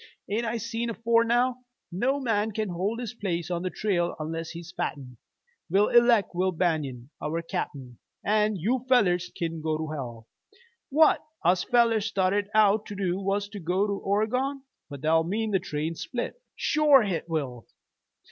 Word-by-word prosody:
An' 220 Hz, +4 st, -1 dB
I 230 Hz, +1 st, -1 dB
seen 230 Hz, +2 st, -3 dB
afore 230 Hz, 0 st, +2 dB
now, 240 Hz, +2 st, +2 dB, 0.3 s
no 255 Hz, +10 st, 0 dB
man 220 Hz, -4 st, 0 dB
can 215 Hz, -1 st, -2 dB
hold 190 Hz, +6 st, -2 dB
his 240 Hz, -3 st, -5 dB
place 180 Hz, -6 st, -3 dB
on 170 Hz, -1 st, -1 dB
the 185 Hz, -, -2 dB
trail 180 Hz, -4 st, 0 dB
unless'n 165 Hz, +1 st, -4 dB
he's 170 Hz, 0 st, -8 dB
fitten. 125 Hz, -4 st, -4 dB, 0.5 s
We'll 195 Hz, +4 st, +3 dB
eleck 235 Hz, -4 st, +4 dB
Will 185 Hz, +2 st, +1 dB
Banion 150 Hz, -7 st, -1 dB
our 165 Hz, +3 st, -2 dB
cap'n, 130 Hz, -6 st, -5 dB, 0.3 s
an' 210 Hz, 0 st, +2 dB
you 230 Hz, +8 st, 0 dB
fellers 180 Hz, -8 st, +3 dB
kin 165 Hz, -1 st, -3 dB
go 155 Hz, 0 st, 0 dB
to 155 Hz, 0 st, -4 dB
hell. 120 Hz, -6 st, -6 dB, 0.6 s
What 310 Hz, +3 st, +4 dB, 0.2 s
us 180 Hz, +1 st, +4 dB
fellers 230 Hz, -3 st, +3 dB
started 200 Hz, -1 st, +1 dB
out 215 Hz, 0 st, +4 dB
to 205 Hz, -, -6 dB
do 190 Hz, -2 st, -1 dB
was 200 Hz, +1 st, -1 dB
to 205 Hz, 0 st, -7 dB
go 180 Hz, +3 st, +1 dB
to 205 Hz, -, -1 dB
Oregon." 250 Hz, +8 st, -1 dB, 0.3 s
"But 140 Hz, -2 st, -8 dB
that'll 160 Hz, +2 st, +3 dB
mean 215 Hz, +5 st, -1 dB
the 190 Hz, -, +3 dB
train's 155 Hz, 0 st, -4 dB
split!" 250 Hz, -, -4 dB
"Shore 295 Hz, -4 st, +5 dB
hit 175 Hz, -4 st, -3 dB
will! 135 Hz, -7 st, -3 dB
195 Hz, 165 wpm, -27 LUFS, 165-225 Hz, 0.6 s, Shore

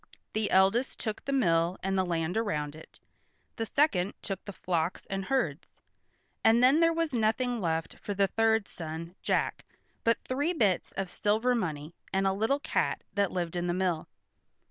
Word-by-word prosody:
The 215 Hz, -1 st, 0 dB
eldest 195 Hz, +7 st, +3 dB
took 215 Hz, -3 st, -3 dB
the 275 Hz, -, -2 dB
mill 170 Hz, -9 st, +2 dB
and 195 Hz, 0 st, 0 dB
the 190 Hz, -, +3 dB
land 170 Hz, -1 st, -1 dB
around 150 Hz, -10 st, -1 dB
it; 160 Hz, -, -14 dB, 0.6 s
the 225 Hz, -1 st, -2 dB
second 205 Hz, -, +2 dB
took 195 Hz, -2 st, -4 dB
the 205 Hz, -, -5 dB
flocks 175 Hz, -2 st, -2 dB
and 195 Hz, 0 st, -2 dB
herds, 185 Hz, -, -2 dB, 0.6 s
and 230 Hz, +2 st, +5 dB
then 270 Hz, +5 st, +6 dB
there 330 Hz, 0 st, +5 dB
was 330 Hz, -3 st, -1 dB
nothing 235 Hz, +1 st, +1 dB
left 165 Hz, -2 st, -2 dB
for 205 Hz, -, -4 dB
the 200 Hz, 0 st, +4 dB
third 220 Hz, 0 st, +2 dB
son, 165 Hz, +1 st, -7 dB
Jack, -, -, 0 dB, 0.4 s
but 230 Hz, 0 st, +3 dB
three 285 Hz, +7 st, 0 dB
bits 210 Hz, -, +1 dB
of 195 Hz, -2 st, -3 dB
silver 220 Hz, +4 st, +1 dB
money, 160 Hz, -8 st, -3 dB, 0.2 s
and 195 Hz, 0 st, +1 dB
a 190 Hz, -, +3 dB
little 225 Hz, +8 st, +1 dB
cat -, -, -1 dB
that 200 Hz, -3 st, +1 dB
lived 175 Hz, -2 st, -2 dB
in 175 Hz, 0 st, -1 dB
the 175 Hz, -, 0 dB
mill. 180 Hz, -4 st, 0 dB
195 Hz, 175 wpm, -29 LUFS, 175-230 Hz, 0.6 s, then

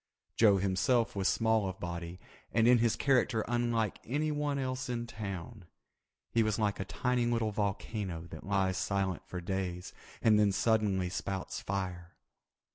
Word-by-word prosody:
Joe 105 Hz, -3 st, +6 dB
himself 100 Hz, +6 st, +1 dB
was 95 Hz, -1 st, +1 dB
small 110 Hz, -3 st, +2 dB
of 95 Hz, -, -8 dB
body 85 Hz, 0 st, -5 dB, 0.3 s
and 115 Hz, +1 st, +3 dB
in 125 Hz, -1 st, +6 dB
his 115 Hz, -1 st, +2 dB
character 130 Hz, -5 st, +2 dB
unlike 120 Hz, -3 st, 0 dB
anyone 145 Hz, +1 st, -1 dB
else 130 Hz, -1 st, -3 dB
in 120 Hz, -1 st, -2 dB
town. 100 Hz, -2 st, -6 dB, 0.7 s
He 115 Hz, -, +3 dB
was 110 Hz, -1 st, +1 dB
like 105 Hz, -2 st, 0 dB
a 95 Hz, -, -2 dB
tiny 120 Hz, +9 st, 0 dB
little 115 Hz, -2 st, +1 dB
volcano 100 Hz, -3 st, -2 dB
that 80 Hz, -, -8 dB
lies 95 Hz, -1 st, +1 dB
silent 95 Hz, -3 st, -1 dB
for 90 Hz, -, -5 dB
days 90 Hz, 0 st, -3 dB, 0.3 s
and 110 Hz, -2 st, +4 dB
then 105 Hz, -2 st, +4 dB
suddenly 100 Hz, -5 st, +2 dB
spouts 95 Hz, +1 st, -4 dB
fire. 90 Hz, -3 st, -4 dB
105 Hz, 150 wpm, -32 LUFS, 95-120 Hz, 0.7 s, Joe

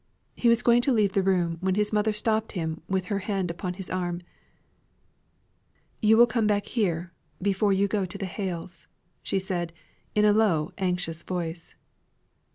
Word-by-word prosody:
He 240 Hz, -, +2 dB
was 235 Hz, +1 st, +3 dB
going 240 Hz, 0 st, +5 dB
to 270 Hz, -, +2 dB
leave 210 Hz, -5 st, +2 dB
the 200 Hz, -, +3 dB
room, 180 Hz, -3 st, +1 dB
when 190 Hz, 0 st, +1 dB
his 210 Hz, +1 st, 0 dB
mother 210 Hz, +1 st, +2 dB
stopped 215 Hz, +1 st, 0 dB
him 160 Hz, -4 st, -3 dB
with 190 Hz, -1 st, 0 dB
her 200 Hz, -, 0 dB
hand 195 Hz, -3 st, -2 dB
upon 180 Hz, +1 st, -4 dB
his 190 Hz, 0 st, -6 dB
arm. 175 Hz, -1 st, -3 dB, 1.8 s
"You 220 Hz, 0 st, +5 dB
will 240 Hz, -, +9 dB
come 235 Hz, -3 st, 0 dB
back 205 Hz, -1 st, +1 dB
here 175 Hz, -7 st, -1 dB, 0.3 s
before 200 Hz, +1 st, +1 dB
you 195 Hz, +1 st, +3 dB
go 200 Hz, -2 st, -1 dB
to 190 Hz, +3 st, -4 dB
the 195 Hz, -, -3 dB
Hales'," 180 Hz, -2 st, -5 dB, 0.4 s
said 185 Hz, -3 st, -2 dB
she, 210 Hz, -, -8 dB
in 210 Hz, -, +5 dB
a 210 Hz, -, +6 dB
low, 195 Hz, -8 st, +2 dB
anxious 180 Hz, -3 st, -1 dB
voice. 170 Hz, -2 st, -5 dB
190 Hz, 170 wpm, -26 LUFS, 175-210 Hz, 1.8 s, will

